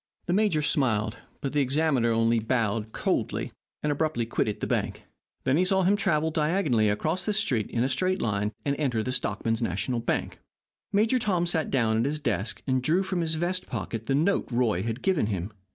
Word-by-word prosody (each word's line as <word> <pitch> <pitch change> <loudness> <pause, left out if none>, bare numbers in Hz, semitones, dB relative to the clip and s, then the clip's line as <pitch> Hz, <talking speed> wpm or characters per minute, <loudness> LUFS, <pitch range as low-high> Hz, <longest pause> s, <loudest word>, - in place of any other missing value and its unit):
The 175 - 0
major 195 -7 +2
smiled, 115 -7 +1 0.2
but 135 - -3
the 150 - +2
examiner 135 -3 +2
only 115 0 +3
bowed 110 -2 -1
coldly, - - -1 0.3
and 150 - +1
abruptly 145 -5 0
quitted 105 -2 -1
the - - -2
bank. - - -2 0.4
They 145 +8 +3
saw 190 +1 +2
him 195 +3 +4
travel 160 -6 +1
diagonally 150 - +2
across 155 - -1
the 210 - 0
street 130 - 0
in 115 - 0
a - - +2
straight 185 +7 0
line 105 -1 0
and 140 0 +1
enter 125 -7 0
the 130 - -2
Stockmen's 115 -3 -1
National 100 +3 -1
Bank. 115 - -2 0.5
Major 220 +5 +3
Tom 185 -6 +1
sat 165 -3 0
down 110 -4 +2
at 115 - +1
his 150 +2 -1
desk, 105 -7 -2
and 130 -1 +1
drew 165 +9 +2
from 185 -2 -1
his 160 -1 0
vest 180 +3 -2
pocket 115 -1 -4
the 135 - +2
note 170 +7 +2
Roy 115 -6 +1
had 115 +3 -4
given 185 - +2
him. 100 -1 -3
135 Hz, 195 wpm, -27 LUFS, 115-170 Hz, 0.5 s, him